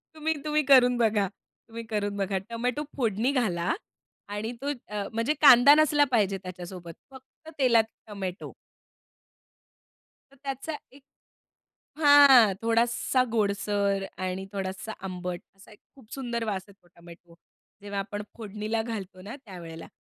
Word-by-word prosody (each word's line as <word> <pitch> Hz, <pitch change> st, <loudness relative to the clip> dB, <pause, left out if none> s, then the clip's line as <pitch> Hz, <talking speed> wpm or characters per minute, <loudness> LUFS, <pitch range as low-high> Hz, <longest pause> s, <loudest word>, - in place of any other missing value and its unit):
तुम्ही, 315 Hz, +1 st, -1 dB
तुम्ही 300 Hz, 0 st, +1 dB
करून 250 Hz, -3 st, +6 dB
बघा. 215 Hz, -4 st, +2 dB, 0.4 s
तुम्ही 230 Hz, 0 st, -8 dB
करून 205 Hz, -1 st, -2 dB
बघा. 195 Hz, 0 st, -1 dB
टोमॅटो 245 Hz, +5 st, -2 dB
फोडणी 230 Hz, +1 st, 0 dB
घाला 190 Hz, -10 st, 0 dB, 0.5 s
आणि 205 Hz, +3 st, -4 dB
तो 285 Hz, -, -2 dB, 0.2 s
अ, 205 Hz, -1 st, -4 dB
म्हणजे 230 Hz, +7 st, 0 dB
कांदा 280 Hz, 0 st, +8 dB
नसला 300 Hz, -1 st, +4 dB
पाहिजे 205 Hz, -5 st, +2 dB
त्याच्यासोबत. 180 Hz, -2 st, -8 dB, 0.2 s
फक्त 265 Hz, +4 st, -15 dB
तेलात 235 Hz, -4 st, +5 dB, 0.2 s
टोमॅटो. 195 Hz, -3 st, -6 dB, 1.8 s
तर -, -, -20 dB
त्याचा 275 Hz, +3 st, -4 dB, 0.2 s
एक 275 Hz, +1 st, -17 dB, 1.0 s
हां, 280 Hz, -8 st, +7 dB
थोडासा 235 Hz, +3 st, +1 dB
गोडसर 200 Hz, -2 st, 0 dB
आणि 185 Hz, +1 st, -4 dB
थोडासा 195 Hz, +2 st, -5 dB
आंबट 180 Hz, -1 st, -5 dB, 0.2 s
असा 195 Hz, +3 st, -18 dB
एक 210 Hz, -, -17 dB, 0.2 s
खूप 230 Hz, -5 st, -19 dB
सुंदर 240 Hz, -4 st, -3 dB
वास 195 Hz, -3 st, -3 dB
आहे 200 Hz, -, -16 dB
तो -, -, -24 dB
टोमॅटो 170 Hz, 0 st, -16 dB, 0.5 s
जेव्हा 200 Hz, -1 st, -5 dB
आपण 205 Hz, +1 st, -5 dB, 0.2 s
फोडणीला 215 Hz, +1 st, -3 dB
घालतो 200 Hz, -5 st, -7 dB
ना 210 Hz, +7 st, -8 dB
त्यावेळेला 170 Hz, -4 st, -10 dB
215 Hz, 130 wpm, -27 LUFS, 195-250 Hz, 1.8 s, कांदा